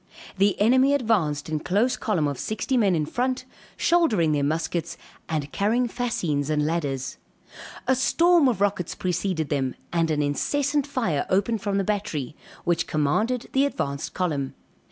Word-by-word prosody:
The 200 0 +3
enemy 260 +6 +4
advanced 190 - 0
in 155 -1 -1
close 215 +10 +1
column 175 -9 0
of 140 -3 -4
sixty 220 +5 -2
men 205 -7 +3
in 155 -2 0
front, 255 - -1 0.3
shouldering 235 - +3
their 145 -1 +1
muskets 165 +2 -2 0.3
and 150 -3 -2
carrying 230 +5 +1
fascines 175 - -1
and 150 -1 +1
ladders. 145 -5 -2 0.7
A 260 - +5
storm 335 +4 +4
of 225 -5 -2
rockets 195 -4 0
preceded 180 -3 -1
them, 135 -3 -1 0.2
and 165 -1 +2
an 150 -1 +1
incessant 285 - 0
fire 225 - -1
opened 205 +3 +1
from 200 -1 -1
the 195 - +1
battery, 175 -10 -2 0.3
which 170 -1 0
commanded 215 - 0
the 270 - +4
advanced 140 - -3
column. 150 -7 -1
185 Hz, 155 wpm, -25 LUFS, 150-240 Hz, 0.7 s, A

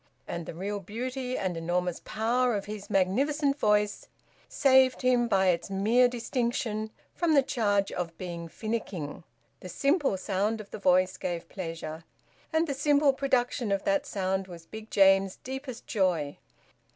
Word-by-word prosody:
And 170 -2 -5
the - - -6
real 200 +4 -3
beauty 250 +6 -4
and 185 -2 -2
enormous 175 +1 -1
power 235 +2 +1
of 200 - -3
his 210 -1 -7
magnificent 275 +10 +1
voice 210 -2 +1 0.4
saved 260 -2 +4
him 250 -1 +3
by 190 -3 +3
its 170 +1 0
mere 220 +6 +4
distinction 235 -3 -2 0.2
from 335 -3 +2
the 280 - +6
charge 205 -6 +1
of 170 -2 -4
being 170 -2 -6
finicking. 195 -7 -4 0.4
The 185 - -9
simple 280 - +1
sound 205 +3 -1
of 210 -2 -10
the - - -6
voice 185 -1 +3
gave 170 -2 -4
pleasure. 165 -3 -6 0.5
And 320 0 +2
the 285 - -2
simple 285 0 +3
production 255 -4 0
of 195 0 0
that 195 0 +1
sound 190 -1 -1
was 170 -2 -11
Big 220 +4 -10
James's 195 -1 +4
deepest 260 -1 -6
joy. 175 -9 0
210 Hz, 150 wpm, -28 LUFS, 185-255 Hz, 0.5 s, the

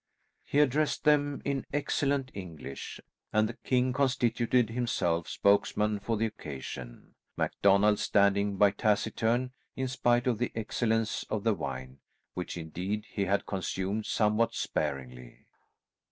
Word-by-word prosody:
He - - -2
addressed 150 +1 +2
them 145 -1 +2
in 140 -2 -1
excellent 140 -2 0
English, 80 -8 -7 0.3
and 110 0 +3
the - - -5
king 125 0 0
constituted 125 -3 +2
himself 90 -9 0
spokesman 105 +1 +2
for 115 +2 -1
the 115 - +1
occasion, 65 - -7 0.2
MacDonald 100 +1 +3
standing 100 0 +2
by 100 0 +5
taciturn, 110 +4 +1 0.2
in 130 - -1
spite 120 -1 +2
of 120 -4 +1
the 125 - -1
excellence 115 0 0
of 105 -2 -2
the 115 - +3
wine, 65 -5 -6 0.3
which 90 0 -5
indeed 90 +6 -4
he 100 - -1
had 100 +1 +1
consumed 95 +2 -2
somewhat 110 +1 +2
sparingly. 65 -4 -4
105 Hz, 125 wpm, -30 LUFS, 95-125 Hz, 0.3 s, by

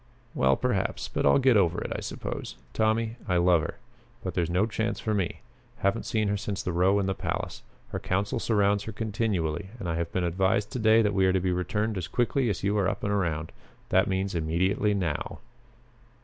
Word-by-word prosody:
"Well, 65 0 +3
perhaps. - - -1
But - - +1
I'll - - +6
get 130 -3 +4
over 95 -5 +3
it, - - -5
I - - -2
suppose. - - -5 0.2
Tommy, 110 +1 +1
I 90 - +2
love 85 -1 +4
her. - - -4 0.5
But - - -3
there's 85 -2 0
no 90 +4 +2
chance 110 +1 -2
for 110 - -1
me. 95 -5 -1 0.4
Haven't 100 +4 0
seen 110 -2 +1
her 100 - +1
since 100 -1 -3
the 90 - -1
row 90 +4 +3
in 100 - +1
the 95 - 0
palace. - - -4 0.3
Her - - -3
council 100 +2 -1
surrounds 100 -2 +2
her 110 - -4
continually 100 -5 -1
and 95 - -4
I 85 -1 -1
have 85 0 -2
been 95 - 0
advised 95 +4 +1
to 125 - -3
day 110 0 +5
that 105 -1 +1
we 95 -1 +3
are 95 - +3
to 95 - +3
be 90 0 0
returned 105 +3 -1
as 85 - -4
quickly 120 +1 +1
as 100 - -2
you 100 +1 +1
are 95 -2 +2
up 100 0 -5
and 105 - 0
around. 80 -5 -1 0.4
That 95 - +4
means 95 0 -1
immediately 90 +6 +1
now." 85 -7 -2
100 Hz, 215 wpm, -27 LUFS, 90-105 Hz, 0.5 s, I'll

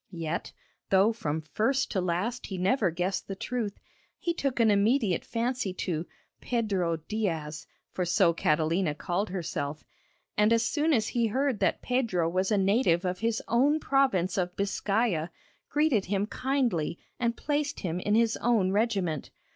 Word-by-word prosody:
Yet, 165 0 -3 0.4
though 195 +4 +4
from 160 -8 -2
first 235 - 0
to 190 - 0
last 185 +8 -2
he 190 - -5
never 195 +2 +2
guessed 180 +3 -2
the 195 - -4
truth, 225 -1 -3 0.4
he 340 - -1
took 275 -6 -2
an 225 -2 +5
immediate 205 -2 +2
fancy 235 -4 -2
to 170 -3 -2 0.3
'Pedro 195 -8 0
Diaz' 165 -8 -3 0.2
for 185 - -2
so 175 0 +3
Catalina 160 +1 +1
called 185 +6 -2
herself 155 -5 -4 0.5
and, 210 +1 +3
as 230 0 +3
soon 300 +7 +1
as 225 -6 +2
he 235 -2 +1
heard 260 0 0
that - - +1
Pedro 230 -10 +1
was 185 +2 0
a 210 - +2
native 195 -2 +2
of 180 0 -1
his 225 0 -1
own 280 +6 +3
province 260 - +2
of 180 0 -2
Biscaya, 200 -3 0 0.4
greeted 290 -9 +2
him 200 +1 0
kindly 240 - -1 0.2
and 235 -1 0
placed 290 0 -1
him 175 -1 -2
in 205 +3 +1
his 230 0 +3
own 220 -6 +2
regiment. 195 -7 0
205 Hz, 155 wpm, -28 LUFS, 180-235 Hz, 0.5 s, an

